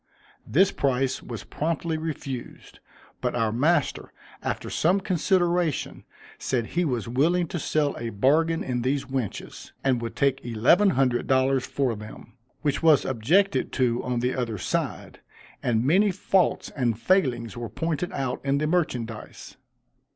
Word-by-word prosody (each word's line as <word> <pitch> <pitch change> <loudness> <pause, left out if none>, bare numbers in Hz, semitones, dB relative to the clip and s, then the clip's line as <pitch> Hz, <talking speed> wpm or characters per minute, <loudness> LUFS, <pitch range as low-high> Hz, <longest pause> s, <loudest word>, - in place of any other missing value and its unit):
This 185 - +4
price 135 -1 0
was 115 -5 -7
promptly 165 +1 -2
refused; 145 -5 -6 0.4
but - - -1
our 115 -3 +1
master, 145 +6 +1 0.3
after - - -3
some 180 +5 +2
consideration, 175 -3 0 0.3
said 120 -3 -1
he 175 +9 -1
was 125 - -1
willing 160 +9 +2
to 175 - -3
sell 150 0 0
a 115 - -3
bargain 155 +10 +2
in 125 -2 -2
these 135 +3 0
wenches, 130 -5 -5
and 130 -3 +2
would 115 -1 -5
take 140 -1 +1
eleven 125 - +4
hundred 125 -3 +1
dollars 130 0 +2
for 130 -3 0
them, 105 +1 -11 0.3
which 145 -3 0
was 160 -3 +5
objected 160 - +2
to 125 -2 +1
on 125 -1 -1
the 125 +1 0
other 115 -4 -2
side; - - -3 0.4
and 115 -1 +1
many 195 +8 +4
faults 190 -1 +1
and 120 -5 -1
failings 125 - +1
were 120 -1 -5
pointed 165 +2 -2
out 130 -6 -3
in 140 0 +1
the 150 - 0
merchandise. 125 -10 -3
135 Hz, 145 wpm, -25 LUFS, 120-165 Hz, 0.4 s, was